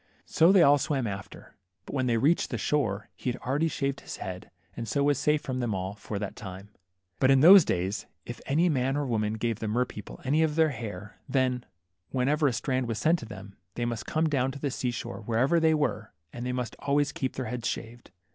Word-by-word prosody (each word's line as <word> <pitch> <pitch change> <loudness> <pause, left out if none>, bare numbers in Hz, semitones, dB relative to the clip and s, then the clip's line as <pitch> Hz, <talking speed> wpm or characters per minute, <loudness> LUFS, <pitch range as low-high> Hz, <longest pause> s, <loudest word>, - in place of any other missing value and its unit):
So 165 +3 +4
they 190 -3 +6
all 145 -1 +6
swam 140 -3 -1
after, 100 -3 -7 0.3
but - - -9
when 130 -2 0
they 115 -1 +2
reached 150 +9 +2
the - - -2
shore, 105 -9 -1
he 125 - -2
had 125 - -7
already 145 +6 +1
shaved 140 -3 -2
his - - -7
head, 90 -1 -7 0.3
and 115 -1 -5
so 140 +6 0
was 145 -1 +2
safe 150 0 +1
from 130 -1 -3
them 120 -5 -1
all 95 +1 -3
for 105 0 -6
that 100 -1 -4
time. 95 0 -9 0.5
But 130 - +4
in 135 -1 +5
those 185 +3 +10
days, 95 0 -2 0.2
if 120 - -8
any 160 +6 +3
man 135 -3 +1
or 145 - -1
woman 110 -3 -1
gave 115 -1 -2
the 110 - -3
mer 120 +4 +1
people 105 -4 -10
any 145 +4 +2
of 155 -2 +1
their 160 -1 +4
hair, 105 -5 -7
then, 130 -2 +1 0.4
whenever 145 +4 +1
a 130 - +1
strand 130 0 -1
was 115 -1 -2
sent 165 +7 +2
to 115 - -8
them, 100 -2 -10 0.2
they 120 - -1
must 115 -2 -4
come 160 0 +1
down 135 -4 +1
to 140 - -8
the 140 -1 -2
sea 125 - -2
shore 120 0 -5
wherever 120 +9 +2
they 160 -1 +4
were, 110 -8 -2 0.2
and 120 +1 -5
they - - -1
must 125 -1 -3
always 145 +1 +1
keep 130 - -3
their 130 - -3
heads 120 +1 -3
shaved. 115 +1 -6
125 Hz, 230 wpm, -28 LUFS, 110-145 Hz, 0.5 s, those